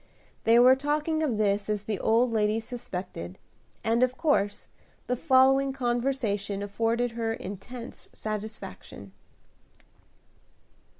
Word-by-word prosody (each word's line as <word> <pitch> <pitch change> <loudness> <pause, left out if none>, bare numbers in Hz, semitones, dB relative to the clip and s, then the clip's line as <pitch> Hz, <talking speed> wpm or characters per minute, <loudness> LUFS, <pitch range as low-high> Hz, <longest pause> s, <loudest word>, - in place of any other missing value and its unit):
They 230 +1 +6
were 250 +2 +8
talking 300 +3 -1
of 270 -9 0
this 205 -1 +1
as 210 -1 -1
the 210 -3 -3
old 230 +2 +3
lady 215 0 +1
suspected, 185 - -6 0.5
and 230 +2 +2
of 255 0 +2
course 205 -11 +1 0.4
the 250 - 0
following 270 0 +4
conversation 240 -6 -1
afforded 230 +4 0
her 225 -1 -2
intense 230 +5 -8
satisfaction. 210 - -7
230 Hz, 110 wpm, -27 LUFS, 205-255 Hz, 0.5 s, were